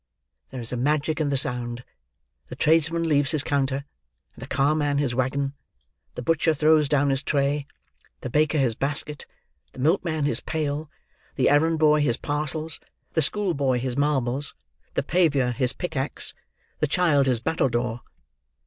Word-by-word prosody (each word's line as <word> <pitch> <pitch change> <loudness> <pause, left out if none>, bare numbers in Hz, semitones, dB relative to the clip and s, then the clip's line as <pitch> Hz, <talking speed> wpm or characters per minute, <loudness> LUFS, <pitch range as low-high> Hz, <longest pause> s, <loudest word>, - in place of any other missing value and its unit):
There 130 - -7
is 115 - -7
a 125 - -2
magic 150 +4 0
in 150 - 0
the 140 - +1
sound. 125 -1 -1 0.6
The - - -8
tradesman 165 +1 +2
leaves 145 -3 +2
his 150 -3 0
counter, 140 -1 -1 0.5
and - - -15
the - - -7
car 140 +2 +2
man 145 -2 0
his 140 -4 0
waggon; 135 +2 -1 0.6
the 125 - -5
butcher 165 +2 +2
throws 155 -1 +3
down 145 -1 +2
his 135 0 0
tray; 140 0 0 0.5
the 125 - -5
baker 155 +2 +2
his 130 -5 +2
basket; 145 +3 -1 0.5
the - - -12
milkman 160 +1 +1
his 120 -5 +2
pail; 150 -1 -3 0.5
the - - +3
errand 160 +3 +3
boy 150 -1 +4
his 120 -6 +1
parcels; 150 +1 -2 0.3
the 160 - +2
school 195 +4 +1
boy 135 -4 +1
his 125 0 -3
marbles; 140 -1 0 0.4
the - - +1
paviour 145 -8 +2
his 125 0 +2
pickaxe; 150 -5 -1 0.5
the 150 - +1
child 145 -4 +2
his 125 -3 +2
battledore. 120 -4 -1
145 Hz, 160 wpm, -24 LUFS, 130-155 Hz, 0.6 s, boy